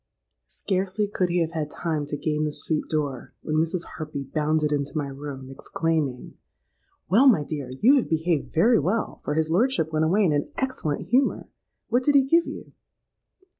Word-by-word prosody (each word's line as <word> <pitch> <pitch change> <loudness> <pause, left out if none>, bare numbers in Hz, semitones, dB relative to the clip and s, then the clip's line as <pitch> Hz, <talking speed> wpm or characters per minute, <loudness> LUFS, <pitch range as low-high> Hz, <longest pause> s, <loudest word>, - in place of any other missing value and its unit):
"Scarcely 195 +2 -1
could 185 -3 -1
he 175 0 +1
have 165 -1 -1
had 155 -3 -3
time 155 -3 -2
to 145 - -3
gain 150 +1 -1
the 150 - -1
street 155 +1 -2
door, 145 -5 -3
when 155 0 -1
Mrs. 165 +2 0
Harpy 150 -3 -5
bounded 150 +2 0
into 145 +1 -2
my 150 - 0
room, 135 -1 -7
exclaiming, 150 -2 -2 0.7
'Well, 235 +9 +5
my 210 - +5
dear, 145 -3 -5
you 270 +6 +6
have 260 - 0
behaved 160 -1 0
very 225 +9 +4
well, 190 +9 -1
for 145 - -2
his 160 0 0
lordship 180 - +1
went 155 0 +2
away 195 +6 +3
in 165 - +3
an 145 0 -1
excellent 255 - -2
humour. 260 +4 +1 0.4
What 245 +2 +2
did 285 +2 +2
he 275 - +7
give 335 +5 +3
you?' - - -8
160 Hz, 180 wpm, -25 LUFS, 150-195 Hz, 0.7 s, he